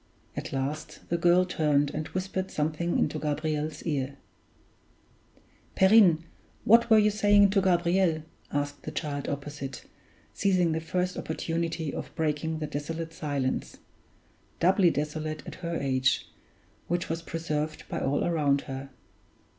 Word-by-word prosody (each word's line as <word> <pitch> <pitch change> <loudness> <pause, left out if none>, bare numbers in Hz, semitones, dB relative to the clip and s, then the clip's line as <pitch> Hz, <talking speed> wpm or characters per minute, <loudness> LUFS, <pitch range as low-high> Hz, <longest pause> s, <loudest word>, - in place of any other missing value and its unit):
At - - -5
last 140 +3 -4
the 170 - +1
girl 175 +2 +5
turned 145 -5 +1
and 155 +1 -4
whispered 190 0 -3
something 155 +3 -1
into 155 - 0
Gabriel's 155 +1 -2
ear: 140 -4 -2 1.6
"Perrine, 190 -5 +6 0.4
what 235 +2 +6
were 220 - +7
you 210 0 +5
saying 205 -1 +5
to 195 -1 +3
Gabriel?" 175 -2 +2 0.3
asked 145 0 -2
the - - -6
child 145 -3 -3
opposite, 140 -2 -5 0.5
seizing 185 -4 +2
the 160 0 -1
first 180 +2 -1
opportunity 165 -1 -2
of - - -5
breaking 160 0 -1
the 155 - -3
desolate 160 +3 -4
silence 145 -5 -2 0.8
doubly 185 +1 +5
desolate 155 0 -3
at - - -7
her 170 -1 -3
age 130 -1 +1 0.6
which 175 +1 -1
was 165 +1 -3
preserved 155 -2 -3
by - - -3
all 140 +2 0
around 145 -5 +2
her. 135 0 -7
160 Hz, 130 wpm, -28 LUFS, 145-175 Hz, 1.6 s, were